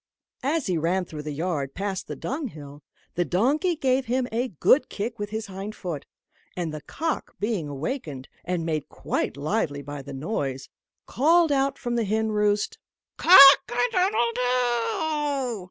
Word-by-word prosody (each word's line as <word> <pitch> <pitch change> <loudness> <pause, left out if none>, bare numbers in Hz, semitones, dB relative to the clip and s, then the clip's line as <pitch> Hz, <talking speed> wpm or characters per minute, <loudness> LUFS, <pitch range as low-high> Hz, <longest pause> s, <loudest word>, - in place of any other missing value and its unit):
As 295 +2 0
he 180 -4 0
ran 180 +4 0
through 155 -3 -7
the 150 0 -5
yard, 150 -3 -3
past 195 -1 -3
the - - -5
dunghill, 155 - -6 0.3
the 175 - +1
donkey 280 - +1
gave 260 -3 0
him 250 +1 0
a 240 +3 0
good 255 - +3
kick 225 +2 -4
with 205 0 -3
his 220 +1 -4
hind 195 +2 -7
foot; 170 -7 -6 0.5
and 170 -3 -3
the 155 - -6
cock 320 - -4
being 205 -7 -1
awakened, 145 - -5 0.2
and 175 -2 -2
made 155 -3 -2
quite - - -3
lively 145 -2 -1
by 145 0 -7
the 140 +1 -10
noise, 135 -3 -4 0.4
called 325 +4 +3
out 275 0 +1
from 240 -2 -4
the 230 - +1
hen 220 +2 0
roost 210 -1 0 0.4
"Cock 275 -6 +9
a 240 - -2
doodle 365 - +2
doo!" 245 0 +1
210 Hz, 160 wpm, -25 LUFS, 155-255 Hz, 0.5 s, Cock